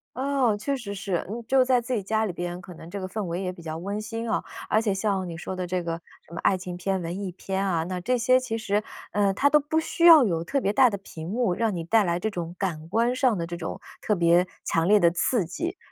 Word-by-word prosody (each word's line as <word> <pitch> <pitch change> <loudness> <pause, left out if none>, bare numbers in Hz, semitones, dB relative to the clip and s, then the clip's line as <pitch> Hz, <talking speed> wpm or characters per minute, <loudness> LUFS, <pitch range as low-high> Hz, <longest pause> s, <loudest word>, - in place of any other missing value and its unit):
哦， 260 -5 +1
确 275 +7 -1
实 210 -6 -6
是。 195 -3 -2
嗯， 235 +2 -4
就 265 -1 +5
在 255 -1 +3
自 250 +2 -4
己 210 -5 -1
家 220 +2 +1
里 185 - -3
边， 175 0 -4
可 180 0 -11
能 165 +1 -11
这 200 +2 -5
个 185 - -4
氛 210 +2 -4
围 170 +2 -3
也 185 -1 -2
比 170 - -13
较 160 -1 -5
温 200 +4 -4
馨 225 +1 -4
哦， - - 0 0.3
而 215 - +3
且 205 -3 0
像 195 -2 -1
你 165 - -6
说 185 +1 -5
的 180 -1 -3
这 180 0 -1
个 170 0 -4 0.3
什 170 - -14
么 - - -5
爱 190 - +3
情 180 -1 -6
片、 190 +1 -1
文 170 +2 -4
艺 185 - -3
片 190 +2 -3
啊， 170 -4 +1
那 180 0 -3
这 250 +6 +1
些 255 +2 +4
其 235 -3 -3
实， 210 -1 0 0.3
呃， 200 -1 +2
它 285 +8 +3
都 300 - +6
不 315 +3 0
需 335 +1 0
要 320 -5 +10
有 165 -4 0
特 275 +10 0
别 200 -4 0
大 255 0 +6
的 200 - -3
屏 165 -3 -9
幕， 225 -4 +1
让 225 0 0
你 170 -2 -3
带 220 +3 +4
来 170 -1 0
这 220 - -1
种 175 -3 -5
感 165 -5 -3
官 235 +4 +2
上 255 -6 +2
的 165 0 -3
这 175 - -5
种 165 -1 -5 0.2
特 210 - +1
别 170 0 +4 0.2
强 165 0 +1
烈 210 +2 +5
的 170 - +5
刺 190 +2 +1
激， 345 - -4
195 Hz, 295 characters per minute, -26 LUFS, 175-230 Hz, 0.3 s, 要